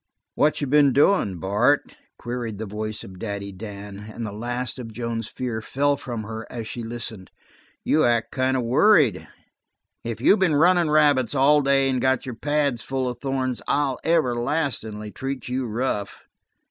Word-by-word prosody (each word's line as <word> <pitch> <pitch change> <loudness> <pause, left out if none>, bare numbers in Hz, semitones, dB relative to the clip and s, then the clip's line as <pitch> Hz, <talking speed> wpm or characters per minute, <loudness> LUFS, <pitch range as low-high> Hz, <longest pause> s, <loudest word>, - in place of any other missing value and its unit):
"What 150 +1 +2
you - - +1
been 140 0 +4
doin', 140 - +3
Bart?" 105 - +1 0.2
queried 120 -3 -5
the 110 - -4
voice 110 +1 -5
of 95 -1 -11
Daddy 100 -2 -4
Dan, 100 0 -8
and 115 +1 -5
the 105 - -5
last 120 +4 -4
of 115 -2 -7
Joan's 115 0 -4
fears 115 -2 -4
fell 145 +1 +1
from 120 -5 -5
her 110 0 -7
as 115 -2 -6
she 120 - -5
listened. 115 -4 -7 0.5
"You 155 - +3
act 120 -2 +1
kind 130 0 +1
of 125 - -1
worried. 125 - +4 0.8
If 115 -1 -4
you 205 - +5
been 180 -5 +2
runnin' 175 +1 +4
rabbits 145 -5 +3
all 145 +2 +5
day 135 -1 +3
and 130 -2 0
got 130 -1 +1
your 130 - -5
pads 145 -1 0
full 130 0 -2
of 125 - -4
thorns 130 -2 -2
I'll 140 -3 +1
everlastin'ly 120 -7 0
treat 135 +2 -5
you 125 0 -2
rough." 110 -3 -3
125 Hz, 170 wpm, -24 LUFS, 110-140 Hz, 0.8 s, you